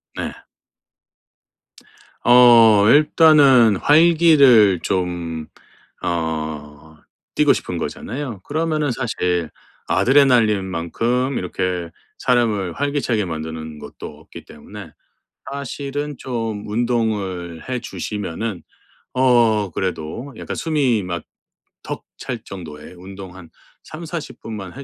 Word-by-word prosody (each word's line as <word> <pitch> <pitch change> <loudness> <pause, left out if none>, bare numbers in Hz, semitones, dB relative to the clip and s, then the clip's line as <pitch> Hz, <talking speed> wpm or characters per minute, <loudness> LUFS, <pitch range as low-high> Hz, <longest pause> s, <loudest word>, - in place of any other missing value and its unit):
네. - - -4 1.9
어 115 -4 +7
일단은 145 - +5
활기를 145 - +5
좀 85 -4 -3 0.5
어 80 -2 -4 0.4
띠고 - - +4
싶은 - - -4
거잖아요. 125 -3 -5
그러면은 155 -1 -1
사실 90 -9 -2 0.4
아드레날린만큼 115 - +2
이렇게 90 -1 -3 0.3
사람을 110 -7 +1
활기차게 140 -7 -1
만드는 80 -2 -6
것도 75 +1 -10
없기 75 +1 -13
때문에 95 +3 -12 0.6
사실은 140 +1 -5
좀 115 -5 -4
운동을 105 -7 -2
해 125 -1 -2
주시면은 105 -1 -5 0.5
어 120 -6 +3
그래도 95 - -4
약간 - - -6
숨이 140 - 0
막 85 -3 -5 0.6
턱 - - -6
찰 125 -3 -5
정도의 80 -6 -10
운동 95 0 -10
한 85 -4 -13 0.3
30-40 165 0 -8
분만 105 -5 -7
해 140 - -7
110 Hz, 200 characters per minute, -20 LUFS, 90-130 Hz, 1.9 s, 어